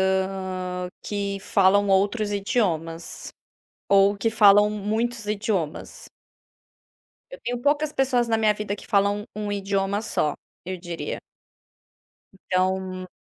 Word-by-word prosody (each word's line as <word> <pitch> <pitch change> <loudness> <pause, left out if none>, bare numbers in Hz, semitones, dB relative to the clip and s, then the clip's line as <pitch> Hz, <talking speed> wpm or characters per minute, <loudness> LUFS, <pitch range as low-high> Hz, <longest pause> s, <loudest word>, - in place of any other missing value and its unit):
hã, 190 -1 -1
que 200 -1 -3
falam 200 +1 +3
outros 205 +2 +2
idiomas, 180 -7 -2 0.6
ou 200 +1 +5
que 200 +3 0
falam 205 -2 +6
muitos 220 +2 -2
idiomas. 200 -7 -3 1.2
Eu - - -9
tenho 245 0 -2
poucas 295 +2 +1
pessoas 255 -3 +2
na 225 -1 +2
minha 215 -1 +3
vida 205 -1 -3
que - - -12
falam 205 0 +2
um 210 0 -3
um 205 - -2
idioma 195 0 -1
só, 155 -8 0 0.3
eu 185 0 -5
diria. 175 -1 -5 1.2
Então 185 0 -2
200 Hz, 120 wpm, -24 LUFS, 190-215 Hz, 1.2 s, falam